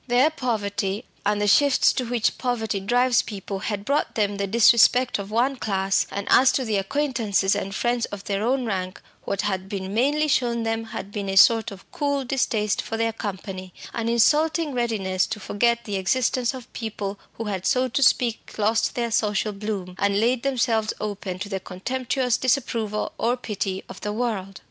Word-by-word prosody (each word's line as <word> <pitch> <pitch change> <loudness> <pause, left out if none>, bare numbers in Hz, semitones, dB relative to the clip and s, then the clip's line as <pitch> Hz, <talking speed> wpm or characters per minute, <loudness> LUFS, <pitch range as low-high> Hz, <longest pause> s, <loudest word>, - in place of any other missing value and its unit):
Their 255 +5 +4
poverty 205 -7 -2 0.2
and 205 0 +1
the 205 - +1
shifts 280 +7 +4
to 255 - -2
which 235 -2 0
poverty 225 -5 -1
drives 245 +5 +3
people 195 -2 -6
had 205 0 -4
brought 285 +5 0
them 205 -2 0
the 200 0 -1
disrespect 235 +3 +5
of 200 0 -6
one 250 +5 +1
class; 195 -3 0
and 200 0 -4
as 260 +1 +6
to 260 - 0
the 215 -3 0
acquaintances 215 -3 0
and 195 0 -4
friends 240 0 0
of 205 -1 -8
their 200 -1 -2
own 255 +2 +1
rank, 185 -3 -3 0.3
what 200 - -1
had 190 -2 -2
been 195 -1 -4
mainly 290 +7 +2
shown 240 -5 +1
them 225 0 -2
had 200 -2 -7
been 200 -2 -4
a 195 - -2
sort 225 +3 +6
of 195 -1 -12
cool 285 -2 -1
distaste 220 -5 0
for 225 - -5
their 225 0 0
company, 190 -3 -6 0.2
an 230 -1 -2
insulting 305 +6 +3
readiness 210 -6 0
to 215 - -4
forget 235 +3 +1
the 205 -2 -2
existence 245 +5 +1
of 255 -2 -11
people 205 -3 -5
who 230 - -5
had 195 -4 -3
so 260 -1 +2
to 255 +3 -1
speak 245 -3 +2
lost 220 +1 +1
their 235 -1 -1
social 210 -1 0
bloom, 195 -3 -4
and 200 0 +2
laid 235 +2 +2
themselves 235 -5 +1
open 200 -3 -4
to 195 +2 -5
the 195 -1 -3
contemptuous 250 +6 -1
disapproval 230 -5 -1
or 240 +2 +1
pity 200 -5 -3
of - - -10
the 210 - -3
world. 210 -4 -3
220 Hz, 185 wpm, -24 LUFS, 200-245 Hz, 0.3 s, as